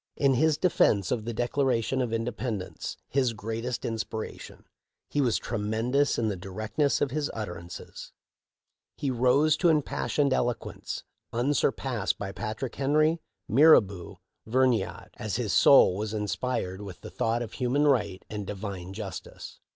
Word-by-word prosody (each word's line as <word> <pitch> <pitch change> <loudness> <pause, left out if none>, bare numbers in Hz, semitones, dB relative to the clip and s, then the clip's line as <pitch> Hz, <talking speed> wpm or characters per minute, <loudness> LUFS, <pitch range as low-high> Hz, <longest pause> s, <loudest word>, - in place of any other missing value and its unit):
In 140 -2 +3
his 155 +3 +3
defence 105 - +2
of 115 -4 -1
the 120 - -2
Declaration 125 +1 0
of 120 -3 -1
Inde 115 +1 -1
pendence 110 -7 -4
— - - -52
his 130 -3 +1
greatest 115 +3 -4
inspiration 110 -1 -5 0.2
— - - -60
he 145 - +1
was 125 -4 +2
"tre 115 -2 -3
mendous 115 +7 +1
in 115 - +1
the 105 - -1
directness 110 +10 -1
of 140 - +1
his 150 +1 -1
utterances; 90 -5 -7 0.9
he 140 - -1
rose 130 +5 +4
to 175 - +3
impassioned 145 -2 +1
eloquence, 120 -2 -2 0.3
unsurpassed 125 -3 0
by 100 -1 -4
Patrick 110 +4 -4
Henry, 155 +4 +2 0.3
Mirabeau, 105 - +4 0.3
or - - -11
Vergniaud, 125 -5 +1
as - - -3
his - - -1
soul 90 - +7
was 105 +2 -3
inspired 105 -2 -2
with 95 -3 -9
the - - -9
thought 115 +1 0
of 115 - -8
human 130 +3 +1
right 105 -9 +1
and 105 -2 -5
Divine 95 -2 -5
justice." - - -8
120 Hz, 150 wpm, -28 LUFS, 105-135 Hz, 0.9 s, soul